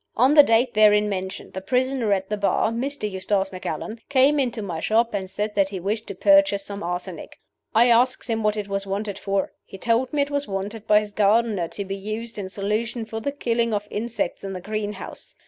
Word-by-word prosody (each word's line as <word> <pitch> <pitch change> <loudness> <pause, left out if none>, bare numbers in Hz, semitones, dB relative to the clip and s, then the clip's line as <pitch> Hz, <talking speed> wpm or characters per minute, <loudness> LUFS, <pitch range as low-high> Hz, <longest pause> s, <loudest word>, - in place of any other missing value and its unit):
On 255 +5 +5
the 300 - +10
date 240 -1 +2
therein 210 -1 +5
mentioned 190 0 -5
the 190 - -5
prisoner 255 +1 0
at 190 -1 +1
the 210 - -1
bar, 205 +2 +1
Mr. 255 0 -2
Eustace 195 0 -1
Macallan, 185 +4 -5
came 280 +2 +4
into 240 -5 -1
my 175 -5 -4
shop, 230 +6 +1
and 190 -2 -3
said 210 +2 -3
that 195 -2 +2
he 195 -2 -5
wished 210 +5 -3
to 200 - -6
purchase 295 -5 +4
some 200 0 -6
arsenic. 175 +1 -5 0.4
I 235 +2 +6
asked 250 +2 +3
him 225 -2 -1
what 210 0 +1
it 205 -1 -3
was 195 0 -3
wanted 200 +1 -3
for. 195 -1 -1
He 195 - -11
told 235 +4 +1
me 295 -2 +2
it 285 - -7
was 285 0 -1
wanted 205 +2 -5
by 210 0 +6
his 210 -1 -7
gardener, 210 -3 +2
to 200 +4 -5
be 195 0 -4
used, 215 +3 -5
in 190 -2 -5
solution, 215 +4 -2
for 220 0 -5
the 280 +6 -2
killing 235 -5 0
of 205 0 -3
insects 220 -4 -3
in 195 -1 -4
the 185 - -5
greenhouse. 210 +1 -6
210 Hz, 215 wpm, -24 LUFS, 195-235 Hz, 0.4 s, the